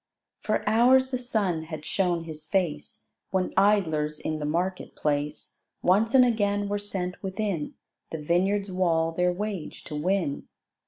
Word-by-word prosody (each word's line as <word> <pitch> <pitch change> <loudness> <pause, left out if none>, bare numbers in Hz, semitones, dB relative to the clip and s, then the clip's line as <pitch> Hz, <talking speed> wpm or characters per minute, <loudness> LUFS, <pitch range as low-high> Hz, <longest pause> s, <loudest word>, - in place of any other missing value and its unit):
For 215 - -1
hours 255 +4 +5
the 255 - -1
sun 200 -10 -1
had 155 -2 -7
shown 175 -1 0
his 155 -1 -8
face, 160 -4 -2 0.2
When 190 -1 -1
idlers 160 -7 +2
in 155 0 -3
the 150 - -3
market 180 +4 -2
place 150 0 -2 0.2
Once 215 +7 +3
and 255 -1 +8
again 205 -3 +1
were 205 0 -1
sent 190 -3 -4
within 190 -5 -3 0.3
The 160 - -4
vineyard's 190 +6 +1
wall 165 -3 +1
their 180 +2 +1
wage 200 -2 -5
to 150 - -7
win. 170 -1 -1
185 Hz, 150 wpm, -27 LUFS, 160-205 Hz, 0.3 s, and